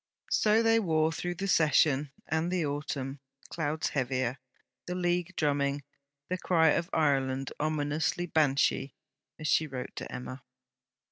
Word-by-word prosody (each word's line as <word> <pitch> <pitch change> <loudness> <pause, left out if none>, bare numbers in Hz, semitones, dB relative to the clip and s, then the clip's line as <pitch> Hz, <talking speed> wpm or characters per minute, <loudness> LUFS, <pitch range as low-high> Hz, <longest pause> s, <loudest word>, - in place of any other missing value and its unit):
So 215 +1 +4
they 225 0 +4
wore 160 -5 +2
through 175 +2 -3
the 195 +3 -3
Session 150 -4 +3 0.2
and 160 +3 0
the 180 -3 0
Autumn, 145 -2 -4 0.3
clouds 155 -1 -2
heavier, 130 -2 -1 0.5
the 180 - -3
League 175 0 -1
drumming, 140 -1 0 0.4
the 185 +2 -2
cry 165 -4 +3
of 165 +4 +1
Ireland 135 -3 +1
'ominously 155 +3 0
Banshee,' 140 -4 +1 0.4
as 155 - -3
she 155 +2 +3
wrote 130 -3 -6
to - - -6
Emma. 130 +1 -7
155 Hz, 135 wpm, -30 LUFS, 140-175 Hz, 0.5 s, So